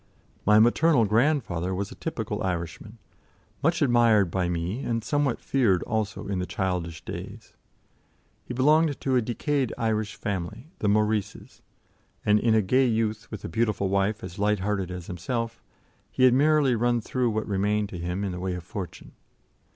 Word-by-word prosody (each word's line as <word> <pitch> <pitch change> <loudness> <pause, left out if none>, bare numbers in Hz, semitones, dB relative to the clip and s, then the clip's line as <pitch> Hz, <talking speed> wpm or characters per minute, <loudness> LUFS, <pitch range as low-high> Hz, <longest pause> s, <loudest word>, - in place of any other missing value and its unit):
My 105 0 +7
maternal 120 +3 +4
grandfather 105 - +1
was 100 +1 -3
a - - -7
typical - - -4
Irishman, 90 +4 -4 0.6
much 165 +1 +2
admired 115 -7 +4
by 90 -1 0
me 90 +6 -2
and 115 -4 -2
somewhat 145 0 0
feared 110 -10 +2
also, 105 -2 -2
in 100 -2 -2
the 90 - -3
childish 90 -4 -3
days. - - -8 0.9
He - - -9
belonged 150 +3 +3
to 130 -1 0
a 125 - +4
decayed 130 +3 -1
Irish 110 -1 -1
family, 105 - -5
the 105 - +1
Maurices, 105 0 -1 0.6
and 105 0 +4
in 115 -1 +3
a 110 - +3
gay 130 +7 +3
youth, 110 -2 -1
with 110 -4 -7
a - - -2
beautiful 105 0 0
wife 100 +3 0
as 90 +4 -8
light 105 -1 +1
hearted 100 -2 -1
as 90 -2 -6
himself, 115 +7 -4 0.5
he 130 - 0
had 130 -1 +7
merrily 145 -1 +4
run 120 +1 +1
through 125 +2 -1
what 110 0 -2
remained 105 +1 0
to 90 - -7
him 90 +3 -3
in 100 - -2
the 90 - -5
way 90 0 -2
of 90 - -7
fortune. 95 +1 -7
105 Hz, 170 wpm, -26 LUFS, 95-120 Hz, 0.9 s, My